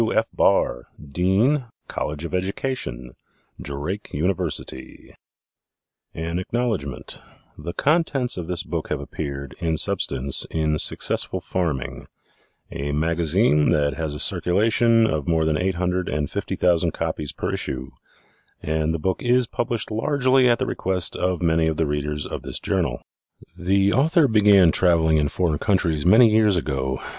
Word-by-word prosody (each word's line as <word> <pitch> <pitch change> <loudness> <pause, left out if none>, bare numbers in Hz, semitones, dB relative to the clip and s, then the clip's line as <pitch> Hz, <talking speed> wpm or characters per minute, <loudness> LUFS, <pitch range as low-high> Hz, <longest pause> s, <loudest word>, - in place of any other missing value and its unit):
_ - - +4
W. 110 - -1
F. 110 +1 +1
BARR - - +1 0.2
Dean 100 - +2 0.2
College 75 +2 -4
of 85 - -7
Education 90 - -3 0.5
Drake 75 +9 -5
University 80 -5 -4 1.0
AN 85 +2 -3
ACKNOWLEDGMENT 90 - -3 0.4
The 85 +3 -7
contents 140 -5 +1
of 90 -3 -5
this 90 -1 -1
book - - -5
have - - -2
appeared, 70 -2 -6
in 80 -3 -1
substance, 70 -2 +2
in 75 -1 0
Successful - - +1
Farming, 80 -8 -3 0.6
a 70 +1 -4
magazine 80 +2 +2
that 70 -1 +2
has 75 0 -4
a - - -6
circulation 115 - +3
of 75 -9 -2
more 80 -1 +1
than 80 -1 +1
eight 90 +3 -1
hundred 90 +1 -1
and 75 -1 -2
fifty - - -3
thousand 85 -2 +1
copies 80 -2 -3
per - - -4
issue, 65 0 -4 0.7
and 80 +1 -1
the - - -3
book 95 +4 -2
is 125 +1 +2
published 115 -1 -3
largely 130 +2 +2
at 120 - +3
the - - -2
request 90 -2 -1
of 90 -2 -1
many 80 -1 +2
of 80 -1 -1
the 80 - +1
readers 75 0 -3
of - - -6
this - - -4
journal. 80 -11 -2 0.5
The 95 +2 +1
author 155 +4 +3
began 100 -6 +5
traveling 80 -3 +3
in 75 -1 +1
foreign 80 -3 -1
countries 85 -7 0
many 115 +6 +7
years 110 -3 +3
ago. 65 -4 -2
85 Hz, 150 wpm, -22 LUFS, 75-105 Hz, 1.0 s, many